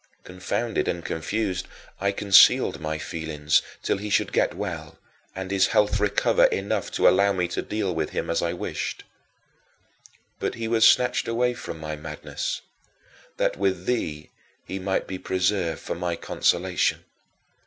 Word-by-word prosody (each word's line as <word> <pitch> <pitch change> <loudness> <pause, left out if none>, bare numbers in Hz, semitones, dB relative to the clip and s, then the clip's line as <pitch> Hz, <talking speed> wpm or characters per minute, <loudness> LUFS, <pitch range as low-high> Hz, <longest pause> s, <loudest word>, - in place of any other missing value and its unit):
Confounded 100 +5 -2
and 85 -1 -2
confused, 95 +3 -2 0.3
I 100 +1 +1
concealed 100 -1 +5
my 80 0 -2
feelings 80 -1 0 0.2
till - - +1
he 105 +1 -5
should - - +1
get - - +2
well - - -5 0.4
and 95 0 -5
his 95 -1 +3
health 105 0 +2
recover 105 -1 +3
enough 100 0 -1
to - - +4
allow 100 +1 +4
me 90 -2 0
to - - -2
deal 105 -4 -2
with 80 -2 -2
him - - -3
as 85 - 0
I 85 - 0
wished. 90 - -4 1.4
But - - -2
he 115 -1 -4
was 115 -1 +5
snatched 125 - +3
away 125 +2 +1
from 120 - -7
my 75 0 -4
madness, 75 - -5 0.8
that - - 0
with 95 -2 0
thee 80 -11 -2 0.3
he 95 - -5
might 95 0 -1
be 95 -1 -6
preserved 90 -3 0
for - - -4
my 85 0 -2
consolation. 90 +1 0
95 Hz, 155 wpm, -25 LUFS, 85-105 Hz, 1.4 s, concealed